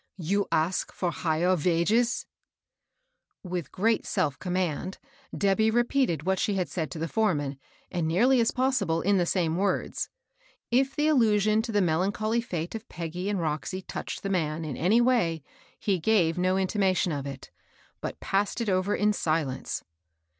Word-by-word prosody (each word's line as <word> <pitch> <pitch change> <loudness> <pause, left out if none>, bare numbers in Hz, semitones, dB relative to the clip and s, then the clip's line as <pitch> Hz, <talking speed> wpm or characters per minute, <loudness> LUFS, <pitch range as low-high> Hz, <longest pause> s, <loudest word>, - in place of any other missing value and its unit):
You 195 +3 0
ask 165 +4 +1
for 175 -2 -2
higher 170 +2 +1
vages? 185 +9 +1 0.6
" - - -56 0.5
With 180 -6 -4
great 220 +4 +1
self 155 -9 0
command 180 0 -2 0.4
Debby 205 +2 +3
repeated 240 - +1
what 190 +1 +1
she 205 - +1
had 185 -3 0
said 160 -4 -3
to - - -7
the 165 +1 -2
foreman, 145 -11 0 0.3
and, 170 -3 -1
nearly 240 +11 +4
as 230 - +3
pos 260 +1 +1
sible, 165 -4 -1
in 200 0 +4
the 175 -2 +1
same 170 -3 +1
words. 195 0 -1 0.6
If 265 +3 +2
the 295 - +1
allnsion 215 -6 +3
to 235 - -4
the 205 -1 +2
melancholy 200 +7 +1
fete 175 -7 -4
of 225 -1 -7
Peggy 175 +3 -4
and 205 -2 0
Roxy 165 +4 -3
touched - - -6
the 195 - -2
man, 160 -3 -1
in 145 -4 -4
any 205 - +3
way, 210 - +2 0.3
he 195 -3 0
gave 170 -4 +3
no 185 +1 +1
intimation 190 -2 +1
of 140 -2 -3
it, 135 -1 -8 0.5
but - - -5
passed 200 +3 0
it 230 -3 -1
over 185 +2 +1
in 210 0 +2
silence. 155 -8 -1
185 Hz, 170 wpm, -27 LUFS, 165-215 Hz, 0.6 s, nearly